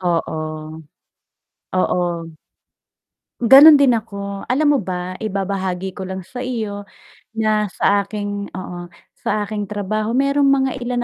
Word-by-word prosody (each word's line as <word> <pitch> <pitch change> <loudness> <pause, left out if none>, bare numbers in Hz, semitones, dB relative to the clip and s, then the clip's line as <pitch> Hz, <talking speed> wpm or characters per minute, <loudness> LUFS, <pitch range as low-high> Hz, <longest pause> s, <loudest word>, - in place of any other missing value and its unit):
Oo. 170 -3 -1 1.4
Oo. 175 -2 -1 1.1
Gano'n 280 +5 +9
din 255 -4 +5
ako, 200 -2 -6
alam 295 +3 +2
mo - - 0
ba 180 0 -4
ibabahagi 190 -2 -3
ko 190 - -5
lang 190 0 -5
sa 250 +8 -7
iyo 215 -5 -4 0.5
na 215 -1 +1
sa 200 +2 +1
aking 205 -1 -4
oo, 175 -1 -7 0.3
sa 210 -1 -1
aking 205 -1 -4
trabaho 215 +3 -2
mayrong 280 +1 +2
mga 265 -1 +2
ilan 245 0 -2
205 Hz, 125 wpm, -20 LUFS, 190-240 Hz, 1.4 s, Gano'n